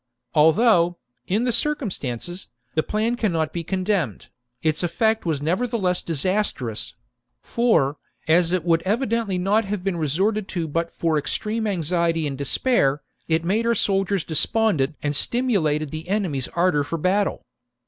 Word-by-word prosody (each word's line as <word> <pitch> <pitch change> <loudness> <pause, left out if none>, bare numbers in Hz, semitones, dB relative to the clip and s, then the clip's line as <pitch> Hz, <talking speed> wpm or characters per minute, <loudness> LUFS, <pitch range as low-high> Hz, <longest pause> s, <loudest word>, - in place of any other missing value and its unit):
Although, 175 +2 +4 0.3
in 210 +5 +1
the 245 - +1
circumstances, 185 - -2 0.3
the 155 - +2
plan 215 +7 -1
cannot 165 -10 -1
be 170 - -3
con 185 +3 -2
demned, 180 - -1 0.3
its 155 -1 +1
effect 220 +4 0
was 145 -3 -1
nevertheless 185 +1 0
disastrous; 165 - -2 0.4
for, 185 - +1 0.3
as 170 +1 +4
it 180 -3 0
would 165 -1 +2
evidently 220 0 0
not 205 +5 +2
have 200 -2 -3
been 190 -3 -1
resorted 190 +7 0
to 170 -3 -3
but 165 +3 -1
for 160 -2 0
extreme 215 +10 -2
anxiety 170 -3 0
and 140 -2 -3
despair, 140 - +1 0.2
it 165 0 +1
made 220 +6 +1
our 235 - +3
soldiers 195 -3 +1
despondent 160 - +1
and 145 0 0
stimulated 155 - +1
the 160 +2 -6
enemy's 180 -11 -1
ardour 170 -4 +2
for 165 +4 -4
battle. 190 +5 0
180 Hz, 145 wpm, -23 LUFS, 155-210 Hz, 0.4 s, Although